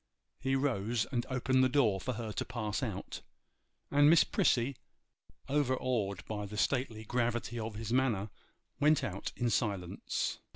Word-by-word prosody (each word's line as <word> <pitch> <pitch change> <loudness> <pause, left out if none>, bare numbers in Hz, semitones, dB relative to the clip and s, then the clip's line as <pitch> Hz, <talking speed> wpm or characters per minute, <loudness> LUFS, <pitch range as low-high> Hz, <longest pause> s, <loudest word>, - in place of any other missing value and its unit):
He 135 +1 0
rose 120 -4 0
and 120 -3 -1
opened 130 0 +2
the 130 - +4
door 115 -9 +2
for 130 - -2
her 115 -1 -4
to - - -2
pass 110 -4 -3
out, - - -4 0.7
and 145 +1 +6
Miss 165 0 +7
Prissy, 130 +2 +2 0.7
overawed 130 -8 0
by 105 -2 -4
the 105 +1 -7
stately 115 -1 0
gravity 120 0 -1
of 110 -1 -4
his 110 +1 -3
manner, 115 -6 +1 0.5
went 150 +1 +4
out 95 -1 -3
in 120 -1 0
silence. 100 -5 -1
120 Hz, 150 wpm, -32 LUFS, 105-130 Hz, 0.7 s, Miss